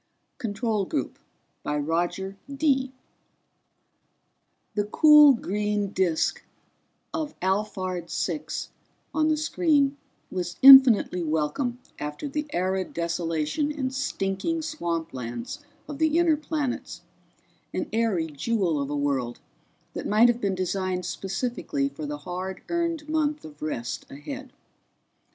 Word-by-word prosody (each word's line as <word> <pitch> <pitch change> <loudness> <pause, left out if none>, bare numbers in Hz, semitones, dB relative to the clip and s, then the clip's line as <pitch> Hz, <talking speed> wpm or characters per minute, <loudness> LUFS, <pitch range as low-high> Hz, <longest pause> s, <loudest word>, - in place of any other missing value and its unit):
_ - - -48
CONTROL 215 -2 -1
GROUP - - -3 0.4
By 150 - -2
ROGER 175 +6 -1 0.2
DEE 275 -2 +1 1.8
The 205 -1 0
cool 300 +5 +8
green 210 -2 -1
disk 180 -5 0 0.7
of 315 -2 -4
Alphard 185 -2 -2
Six 300 - -3 0.4
on 310 0 +2
the 310 -1 +2
screen 295 -3 +2 0.3
was 180 -1 -4
infinitely 260 -9 +9
welcome 165 - -1 0.2
after 150 - -4
the 300 +1 -3
arid 185 +1 -1
desolation 170 - -1
and 265 -3 -3
stinking 270 - -2
swamplands 170 - -4 0.3
of 290 -1 -7
the 315 0 +3
inner 340 -2 +4
planets, 295 -3 -3 0.7
an - - -2
airy 220 -7 +1
jewel 160 +1 -1
of 140 - -3
a 145 - -2
world 135 -4 -1 0.5
that - - -4
might 220 +3 +5
have 240 0 0
been 195 -2 0
designed 185 0 -2
specifically 195 - -2
for 140 +2 -6
the 145 0 -4
hard 185 +1 -5
earned 335 -3 -1
month 305 -1 0
of 150 -1 -12
rest 120 -6 -4
ahead. 265 - -8
205 Hz, 120 wpm, -26 LUFS, 170-280 Hz, 1.8 s, infinitely